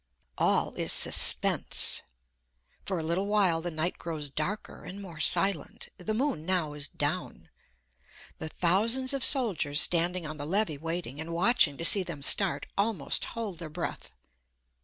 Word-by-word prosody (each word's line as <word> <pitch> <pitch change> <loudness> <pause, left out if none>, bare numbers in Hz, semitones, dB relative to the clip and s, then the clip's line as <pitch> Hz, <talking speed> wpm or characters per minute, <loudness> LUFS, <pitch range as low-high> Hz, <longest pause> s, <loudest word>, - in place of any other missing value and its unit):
All - - +1
is - - +1
suspense. - - +4 0.9
For 190 - -1
a 160 - -4
little 170 +5 -2
while 195 -6 +1
the 175 - -3
night 165 +2 -3
grows 155 -4 -6
darker 180 +9 -5
and 195 - -9
more 175 -6 -10
silent; 175 +1 0
the 215 +4 -5
moon 245 - -2
now 170 -4 -1
is 145 -1 -2
down. - - -5 0.9
The 160 - -6
thousands 230 - +1
of 275 - -3
soldiers 190 - +1
standing 175 +1 +2
on 155 0 -7
the 145 0 -7
levee 175 -5 -1
waiting, 165 -3 -6
and 165 +1 -7
watching 175 - +2
to 165 - 0
see 195 - +9
them 170 -6 -7
start, 195 +4 +3
almost 200 -8 -1
hold 205 -7 -6
their 165 -3 -7
breath. 165 +2 -7
175 Hz, 155 wpm, -27 LUFS, 155-200 Hz, 0.9 s, see